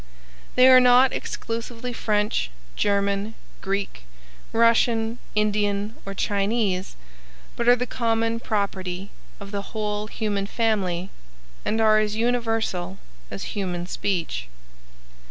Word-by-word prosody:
They 255 +1 +7
are 255 -1 +9
not 250 +1 +6
exclusively 230 +1 -4
French, 210 - 0 0.3
German, 200 +1 0 0.3
Greek, 195 - -3 0.5
Russian, 230 0 +3 0.2
Indian 210 0 +1
or 195 - -5
Chinese, 200 -2 0 0.6
but 235 - -2
are 245 - +8
the 250 0 -2
common 230 -1 0
property 195 -4 -2 0.3
of 200 -1 -9
the 200 -1 -2 0.2
whole 210 0 -2
human 205 -3 -2
family 195 -5 0 0.5
and 220 - 0
are 215 -1 +5
as 215 0 0
universal 225 -6 0 0.3
as 100 - -6
human 180 -3 -2
speech. 170 - -2
210 Hz, 110 wpm, -24 LUFS, 195-230 Hz, 0.6 s, are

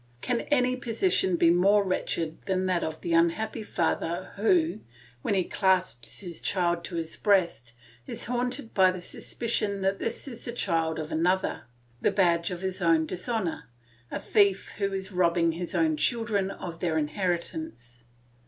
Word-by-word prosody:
Can 245 -2 0
any 255 -3 +3
position 235 - +1
be 170 0 +5
more 200 +4 +4
wretched 165 -4 -2
than 185 -1 +1
that 185 -2 +1
of 160 0 -4
the 170 - -2
unhappy 170 +7 +2
father 175 -2 -1
who, 320 - +2 0.4
when 200 - 0
he 185 - +2
clasps 185 - 0
his 175 -4 -8
child 175 -2 +1
to 175 - -6
his 165 -1 -3
breast, 170 - +1 0.3
is - - -5
haunted 245 +1 -2
by 190 -1 +6
the 185 0 -3
suspicion 210 -1 -2
that 195 +1 0
this 230 +4 -3
is 240 -3 -8
the 235 - -5
child 165 -8 0
of 155 -1 -5
another, 180 +4 0 0.4
the - - +3
badge 170 -4 +2
of 180 0 -5
his 190 0 -3
own 165 -2 +4
dishonour, 185 +1 -3 0.4
a - - -3
thief 200 -2 +2
who 200 -1 0
is 190 0 -4
robbing 170 -2 +3
his 175 +3 -5
own 160 -2 +3
children 205 +3 +1
of 170 -4 -7
their 165 -3 0
inheritance. 170 - -3
185 Hz, 160 wpm, -28 LUFS, 170-210 Hz, 0.4 s, by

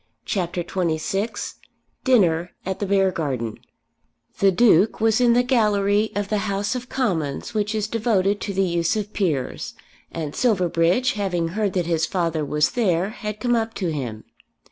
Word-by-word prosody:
CHAPTER 175 -2 -2
XXVI 190 +5 -2 0.5
Dinner 180 - +3
at 190 0 -3
the 200 - -2
Beargarden 160 - 0 0.8
The 195 -1 +5
Duke 210 -1 +4
was 225 +1 +3
in 240 -1 +5
the 245 +1 +4
gallery 210 -4 +2
of 205 -1 -1
the 210 - +1
House 200 +2 -1
of 250 0 -5
Commons 175 - -2
which 210 0 -1
is 210 -1 -1
devoted 205 -3 +1
to 205 - -3
the 195 0 +1
use 170 +2 0
of 210 -1 -3
peers, 155 -11 -2 0.4
and 155 -3 -5
Silverbridge, 185 0 +2
having 180 -5 -1
heard 205 +2 -1
that 180 -2 0
his 165 -1 0
father 165 -4 -1
was 150 +1 +1
there, 190 -6 +1
had 210 -2 -6
come 245 +2 +1
up 225 -1 -1
to 180 -4 -1
him. 120 -8 -4
195 Hz, 160 wpm, -23 LUFS, 170-215 Hz, 0.8 s, The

